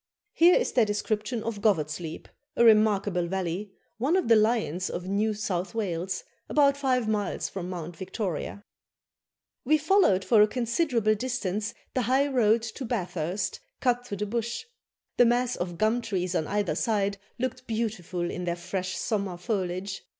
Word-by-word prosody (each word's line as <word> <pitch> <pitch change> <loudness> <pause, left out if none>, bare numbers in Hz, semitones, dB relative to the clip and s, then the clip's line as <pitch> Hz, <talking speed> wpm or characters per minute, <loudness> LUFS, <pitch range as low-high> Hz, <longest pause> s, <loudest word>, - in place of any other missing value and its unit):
Here 345 +2 +6
is - - +1
their 240 - +4
description 215 +2 -1
of 220 -3 -4
Govat's 155 -8 +1
Leap, 165 -2 -7 0.3
a 235 - +4
remarkable 205 -5 +4
valley, 190 +2 -3 0.3
one 280 +9 +2
of 370 -10 +1
the 230 - +8
lions 215 -5 +1
of 180 +1 -5
New 210 +2 +1
South 195 -1 -3
Wales, 185 -3 -2 0.3
about 280 -2 +4
five 255 -4 +1
miles 210 -2 -1
from 185 -2 -5
Mount 175 -2 -6
Victoria: 190 +1 -4 1.0
"We 310 +4 +4
followed 305 - +3
for 225 -3 +5
a 210 - +7
considerable 235 -1 +1
distance 215 -3 -2 0.2
the 255 - +1
high 260 +4 +3
road 230 -4 +3
to 230 +4 -6
Bathurst 185 -5 -2 0.2
cut 245 -1 +1
through 200 - -4
the 210 - -1
bush. 235 - -3 0.5
The 245 - +7
mass 245 +1 +2
of 175 -1 -4
gum 220 +4 +2
trees 190 -5 -2
on 160 -4 0
either 205 -5 0
side 200 +2 0 0.2
looked 255 0 -3
beautiful 200 -6 -2
in 180 - -4
their 170 -1 -1
fresh 185 +1 -4
summer 200 -5 -2
foliage. 185 0 -3
210 Hz, 160 wpm, -27 LUFS, 185-235 Hz, 1.0 s, the